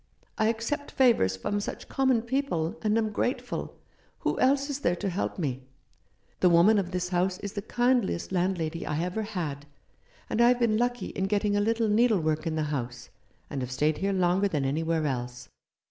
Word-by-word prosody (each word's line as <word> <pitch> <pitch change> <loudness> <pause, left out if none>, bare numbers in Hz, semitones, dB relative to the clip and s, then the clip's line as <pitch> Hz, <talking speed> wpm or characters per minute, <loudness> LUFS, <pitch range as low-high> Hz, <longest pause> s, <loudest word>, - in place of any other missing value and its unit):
I 215 - +3
accept 230 +6 -2
favours 230 - +3
from 205 - -2
such 205 - -6
common 260 -4 +2
people, 240 - -1
and 215 0 +2
am 220 -1 0
grateful. 245 +5 -2 0.5
Who - - -1
else 275 +2 +3
is 285 -1 -3
there 175 -10 +1
to 195 +3 -3
help 185 +2 -2
me? 135 -7 -2 0.8
The 180 - +5
woman 180 +6 +5
of 185 -3 -2
this 180 -1 -2
house 180 +1 0
is 200 0 -5
the 200 - -3
kindliest 240 -5 0
landlady 175 -3 -1
I 150 0 -2
ever 180 +5 -2
had, 160 -9 -4 0.6
and 230 - 0
I 235 - +7
have 245 0 +4
been 225 -3 +2
lucky 245 +1 -1
in 190 - -2
getting 205 +1 +1
a 205 - +2
little 225 +1 +1
needlework 205 -9 +2
in 160 - -1
the 155 - 0
house, 120 -3 -5 0.4
and 135 - -4
have 125 - -4
stayed 150 +4 0
here 200 +1 0
longer 185 +1 +2
than 150 -7 -1
anywhere 160 +3 0
else. 125 -2 -4
190 Hz, 190 wpm, -28 LUFS, 160-225 Hz, 0.8 s, I